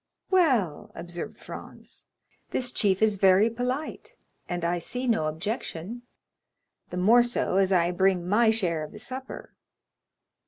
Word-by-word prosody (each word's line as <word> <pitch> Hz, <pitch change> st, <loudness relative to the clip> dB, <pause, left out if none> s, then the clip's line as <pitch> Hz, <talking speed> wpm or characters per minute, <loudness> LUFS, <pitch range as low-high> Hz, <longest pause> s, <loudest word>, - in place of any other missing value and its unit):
"Well," 255 Hz, -, +2 dB
observed 175 Hz, +1 st, -6 dB
Franz, -, -, -11 dB, 0.4 s
"this 250 Hz, -1 st, -1 dB
chief 200 Hz, -3 st, +2 dB
is 215 Hz, -2 st, +3 dB
very 195 Hz, +3 st, +5 dB
polite, 255 Hz, -, -4 dB, 0.3 s
and 175 Hz, -1 st, -2 dB
I 175 Hz, +1 st, 0 dB
see 250 Hz, +9 st, -3 dB
no 225 Hz, -11 st, +1 dB
objection—the 185 Hz, +5 st, -4 dB, 1.0 s
more 220 Hz, +7 st, +6 dB
so 240 Hz, -5 st, 0 dB
as 195 Hz, -1 st, +3 dB
I 175 Hz, -2 st, +3 dB
bring 180 Hz, -1 st, +1 dB
my 220 Hz, +4 st, +4 dB
share 175 Hz, -8 st, 0 dB
of 155 Hz, -, -9 dB
the -, -, -9 dB
supper." 255 Hz, +4 st, -8 dB
200 Hz, 130 wpm, -27 LUFS, 175-240 Hz, 1.0 s, more